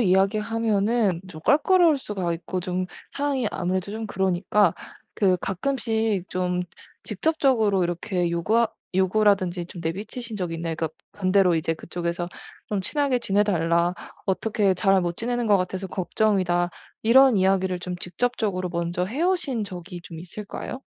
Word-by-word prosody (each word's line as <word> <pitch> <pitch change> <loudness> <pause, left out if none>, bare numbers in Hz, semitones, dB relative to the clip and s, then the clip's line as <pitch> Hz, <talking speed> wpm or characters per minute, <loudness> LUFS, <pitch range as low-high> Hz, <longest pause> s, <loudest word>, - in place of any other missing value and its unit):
이야기하면은 210 0 +2
좀 155 -3 -10
껄끄러울 325 - +4
수가 190 -8 -3
있고 170 +2 -4
좀 180 +1 -2 0.3
상황이 280 -4 0
아무래도 185 +2 -2
좀 220 +1 -4
그러니까 190 0 +2 0.4
그 190 -3 +3
가끔씩 220 -2 -1
좀 180 0 0 0.4
직접적으로 220 - +2
이렇게 175 +1 -1
요구하 215 +8 +2 0.3
요구라든지 190 -2 +2
좀 175 -1 -9
내비치신 215 +7 -4
적이 175 -3 -2
있나요? 165 0 -3
그러니까 160 -1 -1 0.2
반대로 185 -2 +3
인제 165 0 0
그쪽에서 175 +1 -4 0.4
좀 205 -2 0
"친하게 275 +6 +1
지내달라. 175 -6 +2 0.3
어떻게 200 +1 +1
잘 190 +1 +3
못 175 -1 -3
지내는 240 0 -1
것 205 -2 +5
같아서 185 +1 -3
걱정이다." 185 -2 +1 0.3
이런 255 +1 +6
이야기를 190 -1 +2
좀 180 0 -4
직접적으로 185 -1 -1
먼저 170 +1 -1
해 245 - -3
오신 315 - +1
적이 180 -2 -7
좀 165 -1 -9
있을까요? 205 +8 -7
190 Hz, 345 characters per minute, -25 LUFS, 175-220 Hz, 0.4 s, 이런